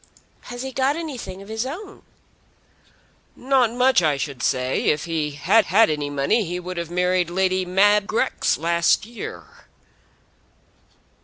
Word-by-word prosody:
"Has 245 +1 -6
he 265 - -5
got 265 +2 +1
anything 250 - -7
of - - -15
his 220 +1 -3
own?" 375 +10 -8 1.3
"Not 255 -3 +2
much, 250 -2 +3
I 155 -4 +1
should 135 -3 -5
say. 130 0 0
If 150 - +1
he 160 -3 -2
had 210 +8 +4
had 210 -3 +4
any 150 -1 -3
money 145 +11 +1
he 180 0 -4
would 180 0 -7
have 170 -1 -4
married 180 0 +1
Lady 185 +1 0
Mab 200 +3 +3
Grex 255 +4 0
last 170 +4 +1
year." 235 +1 -8
190 Hz, 145 wpm, -22 LUFS, 170-240 Hz, 1.3 s, had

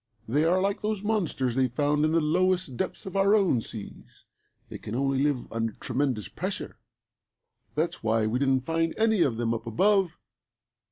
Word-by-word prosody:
They 145 +7 +2
are 180 +3 +3
like 200 +1 0
those 210 -1 -2
monsters 180 - 0
they 130 +1 +2
found 145 +4 +1
in 155 - +2
the 165 - +3
lowest 180 -1 +1
depths 185 - -4
of 190 - -7
our 195 +2 +4
own 185 - +3
seas. 110 -2 -8 0.4
They - - -8
can 105 - -6
only 135 +1 +1
live 140 -4 0
under 115 -1 -1
tremendous 130 - -2
pressure. - - -5 1.0
That's 160 +3 -1
why 110 0 +1
we 115 +3 0
didn't 135 -2 +1
find 165 0 0
any 220 -3 +3
of 125 -8 +2
them 115 -1 0
up 115 0 -5
above. 190 - +2
145 Hz, 175 wpm, -27 LUFS, 120-185 Hz, 1.0 s, our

